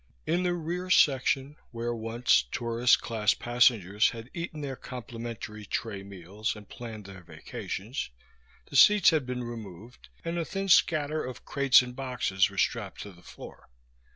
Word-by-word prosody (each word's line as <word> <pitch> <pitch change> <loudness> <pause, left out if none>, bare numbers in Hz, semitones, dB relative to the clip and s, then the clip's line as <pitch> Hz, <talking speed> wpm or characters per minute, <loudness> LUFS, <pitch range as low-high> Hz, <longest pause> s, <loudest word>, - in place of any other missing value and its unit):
In 175 +2 +1
the 180 -1 0
rear 175 +2 -4
section, 135 -2 +3
where 120 0 -3
once 115 - +2
tourist 120 +1 +2
class 110 -3 +1
passengers 115 -5 +3
had 115 +1 -9
eaten 170 -3 -5
their 135 -2 -4
complimentary 115 -4 -7
tray 100 0 -4
meals 100 +3 -5
and 105 -1 -12
planned 110 -4 -9
their 95 -1 -11
vacations, 90 - -6 0.6
the - - -11
seats 205 +7 +7
had 155 -5 0
been 125 -1 -3
removed 115 -1 -10 0.2
and 170 +1 -2
a - - 0
thin 195 +3 -4
scatter 155 -3 +3
of 125 -1 -8
crates 135 -2 +5
and 125 0 -8
boxes 125 -8 0
were - - -13
strapped - - -1
to 100 - -8
the 85 -2 -18
floor. 80 - -13
120 Hz, 155 wpm, -28 LUFS, 105-140 Hz, 0.6 s, seats